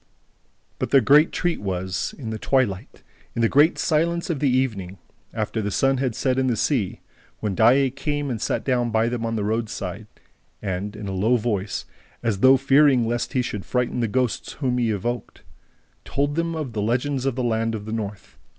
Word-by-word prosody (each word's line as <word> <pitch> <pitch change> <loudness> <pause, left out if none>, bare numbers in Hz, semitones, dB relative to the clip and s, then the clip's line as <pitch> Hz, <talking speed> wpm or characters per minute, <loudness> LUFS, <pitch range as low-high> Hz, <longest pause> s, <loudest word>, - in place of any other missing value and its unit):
But - - -2
their 135 - +6
great 150 +4 +5
treat 175 -1 -1
was, 95 -2 -3
in 115 -6 -5
the 110 - -4
twilight, 105 -3 -1 0.3
in 115 - 0
the - - +5
great 150 +7 +4
silence 170 +1 +1
of 155 - -2
the 140 - +2
evening, 110 -8 -1 0.3
after 110 - -2
the 105 - -2
sun 135 +6 +2
had 125 -3 -1
set 130 -1 0
in 130 - +1
the 120 - +1
sea, 110 -5 -1 0.4
when 105 -2 -2
Daae 130 +6 +4
came 145 +1 -2
and 115 -3 -4
sat - - -1
down 125 -3 +1
by 110 +1 +2
them 120 -1 -2
on 115 - -2
the 105 - -1
roadside 110 -2 -3 0.5
and, 100 +2 -4
in 105 -1 -6
a - - -3
low 105 +6 +2
voice, 105 -3 -2 0.4
as 110 -4 0
though 130 +4 +7
fearing 135 -2 +4
lest 120 +4 -2
he 130 -2 +1
should 105 -5 -4
frighten 125 0 -1
the 115 - +1
ghosts 125 +1 -1
whom 125 -3 -1
he 120 -2 +1
evoked, 120 +4 -3 0.6
told 145 +1 -1
them 165 +1 -1 0.2
the 105 -2 -3
legends 130 +5 0
of 135 - 0
the 130 - -2
land 115 -1 0
of 105 -1 -6
the 110 - -5
North. 105 -3 -6
120 Hz, 195 wpm, -23 LUFS, 105-135 Hz, 0.6 s, though